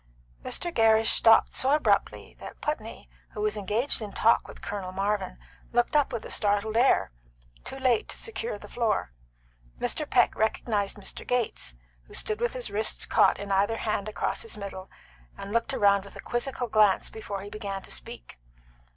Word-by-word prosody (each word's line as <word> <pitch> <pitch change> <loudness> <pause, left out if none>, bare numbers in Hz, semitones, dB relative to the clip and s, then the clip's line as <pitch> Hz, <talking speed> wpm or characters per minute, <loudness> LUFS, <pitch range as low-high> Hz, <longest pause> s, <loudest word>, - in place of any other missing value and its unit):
Mr. 345 -1 -2
Gerrish 225 0 +5
stopped 225 -1 +6
so 260 - +2
abruptly 200 - +1
that - - -10
Putney, - - -4 0.3
who 210 - -5
was 215 0 +1
engaged 210 +6 -1
in 210 -2 -5
talk 230 +3 +3
with - - -11
Colonel 195 -3 -4
Marvin, 195 0 -2 0.3
looked 240 +4 +1
up 290 -2 +3
with 230 - -4
a - - -6
startled 205 +1 +1
air, 240 - +3 0.5
too - - -7
late 255 -4 +1
to - - -3
secure 455 +1 -4
the - - -12
floor. 225 - -1 0.7
Mr. - - -1
Peck - - +4
recognised 215 -2 0
Mr. 200 - -6
Gates, 235 - -1 0.3
who - - -11
stood 215 +1 -2
with 240 -1 0
his 245 -5 -4
wrists 215 +2 +1
caught - - +4
in 200 0 -6
either 200 +4 +2
hand 215 -2 -2
across 215 - -2
his 455 - -3
middle, 195 -2 -7 0.5
and 195 - -7
looked 230 0 +1
round 200 -1 +3
with 200 - -13
a - - -10
quizzical 245 +1 -2
glance 215 -4 +3
before 205 -3 -6
he 200 - -8
began 200 -3 -5
to - - -10
speak. - - -7
215 Hz, 175 wpm, -27 LUFS, 200-235 Hz, 0.7 s, stopped